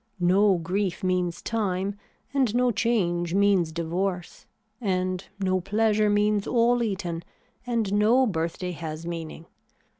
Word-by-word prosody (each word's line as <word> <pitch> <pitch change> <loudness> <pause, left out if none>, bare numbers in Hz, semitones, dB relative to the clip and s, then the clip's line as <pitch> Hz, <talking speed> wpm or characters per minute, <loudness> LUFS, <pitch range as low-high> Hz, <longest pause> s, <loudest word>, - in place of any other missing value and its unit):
No 190 +2 +4
grief 180 +3 -2
means 180 -2 -1
time 200 -3 -1 0.4
and 260 -5 +1
no 250 0 +3
change 185 -6 0
means 195 -5 +3
divorce, 175 +2 -3 0.3
and 185 -2 -1 0.2
no 185 -1 +1
pleasure 215 +2 +2
means 205 0 +2
all 240 0 +3
eaten, 190 -6 -2 0.5
and 225 -5 0
no 225 +6 +4
birthday 180 -2 -2
has 160 0 -6
meaning. 165 -1 -6
190 Hz, 120 wpm, -26 LUFS, 175-210 Hz, 0.5 s, No